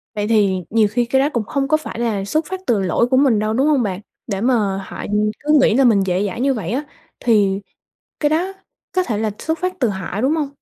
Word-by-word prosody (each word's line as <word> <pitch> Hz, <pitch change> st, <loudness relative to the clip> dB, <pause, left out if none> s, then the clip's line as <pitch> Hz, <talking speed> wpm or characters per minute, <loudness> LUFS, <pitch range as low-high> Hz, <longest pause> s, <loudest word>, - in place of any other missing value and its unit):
Vậy 210 Hz, 0 st, -1 dB
thì 200 Hz, -4 st, +2 dB
nhiều 220 Hz, -1 st, +3 dB
khi 240 Hz, +2 st, +1 dB
cái 265 Hz, +3 st, +1 dB
đó 285 Hz, -, +2 dB
cũng 235 Hz, -, 0 dB
hông 275 Hz, -1 st, -1 dB
có 310 Hz, -, +3 dB
phải 310 Hz, -6 st, -7 dB
là 215 Hz, -5 st, -1 dB
xuất 310 Hz, +10 st, 0 dB
phát 375 Hz, +2 st, -5 dB
từ 225 Hz, -4 st, +2 dB
lỗi 195 Hz, +5 st, +1 dB
của 260 Hz, +1 st, +2 dB
mình 260 Hz, -6 st, +4 dB
đâu, 215 Hz, +1 st, -1 dB
đúng 265 Hz, +5 st, +2 dB
hông 290 Hz, -5 st, +3 dB
bạn? 195 Hz, -3 st, -3 dB, 0.3 s
Để 200 Hz, -4 st, -3 dB
mà 215 Hz, -5 st, +1 dB
họ, -, -, -9 dB
ừm, 210 Hz, +1 st, 0 dB
cứ 300 Hz, +1 st, +3 dB
nghĩ 220 Hz, -, +4 dB
là 270 Hz, -, +4 dB
mình 225 Hz, -6 st, +4 dB
dễ 185 Hz, +2 st, 0 dB
dãi 200 Hz, +5 st, -5 dB
như 275 Hz, +1 st, +2 dB
vậy 205 Hz, -7 st, -4 dB
á, 265 Hz, +5 st, -1 dB, 0.4 s
thì 205 Hz, -4 st, +2 dB, 0.6 s
cái 295 Hz, -, +3 dB
đó 340 Hz, +5 st, 0 dB, 0.4 s
có 370 Hz, -, +2 dB
thể 230 Hz, -, -2 dB
là 220 Hz, 0 st, 0 dB
xuất 320 Hz, 0 st, -2 dB
phát 365 Hz, 0 st, -1 dB
từ 245 Hz, -, +3 dB
họ, 190 Hz, 0 st, -4 dB
đúng 270 Hz, +6 st, +2 dB
hông? 295 Hz, -3 st, -1 dB
230 Hz, 260 wpm, -19 LUFS, 205-275 Hz, 0.6 s, mình